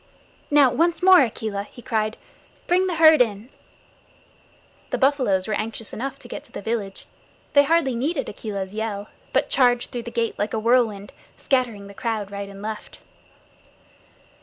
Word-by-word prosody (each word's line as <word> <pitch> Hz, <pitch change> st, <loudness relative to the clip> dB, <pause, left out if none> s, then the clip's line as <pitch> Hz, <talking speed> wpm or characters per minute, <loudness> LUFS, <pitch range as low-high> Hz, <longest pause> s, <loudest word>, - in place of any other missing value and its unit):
"Now, 290 Hz, -3 st, +5 dB
once 335 Hz, +6 st, +1 dB
more, 375 Hz, -1 st, +8 dB
Akela," 220 Hz, -4 st, -2 dB
he 240 Hz, -, -13 dB
cried. 215 Hz, -2 st, -1 dB, 0.5 s
"Bring 365 Hz, +2 st, +2 dB
the 355 Hz, -, -1 dB
herd 315 Hz, -3 st, +7 dB
in." 220 Hz, 0 st, 0 dB, 1.4 s
The -, -, -1 dB
buffaloes 255 Hz, -9 st, +2 dB
were 215 Hz, -, -1 dB
anxious 220 Hz, +1 st, -4 dB
enough 270 Hz, +4 st, -4 dB
to -, -, -13 dB
get -, -, -7 dB
to -, -, -22 dB
the -, -, -6 dB
village. 210 Hz, -3 st, -4 dB, 0.5 s
They 285 Hz, -1 st, +6 dB
hardly 320 Hz, -4 st, +2 dB
needed 275 Hz, +5 st, -2 dB
Akela's 200 Hz, -2 st, -5 dB
yell, 215 Hz, -2 st, -4 dB, 0.2 s
but -, -, +1 dB
charged 245 Hz, -2 st, +2 dB
through 240 Hz, -, -4 dB
the 235 Hz, -, -7 dB
gate 235 Hz, -1 st, -2 dB
like 210 Hz, +2 st, -1 dB
a -, -, 0 dB
whirlwind, 220 Hz, -3 st, +1 dB, 0.2 s
scattering 245 Hz, -7 st, -1 dB
the 200 Hz, -, -11 dB
crowd 215 Hz, -2 st, -3 dB
right 200 Hz, 0 st, -6 dB
and 200 Hz, 0 st, -11 dB
left. 215 Hz, 0 st, -6 dB
230 Hz, 160 wpm, -23 LUFS, 210-270 Hz, 1.4 s, more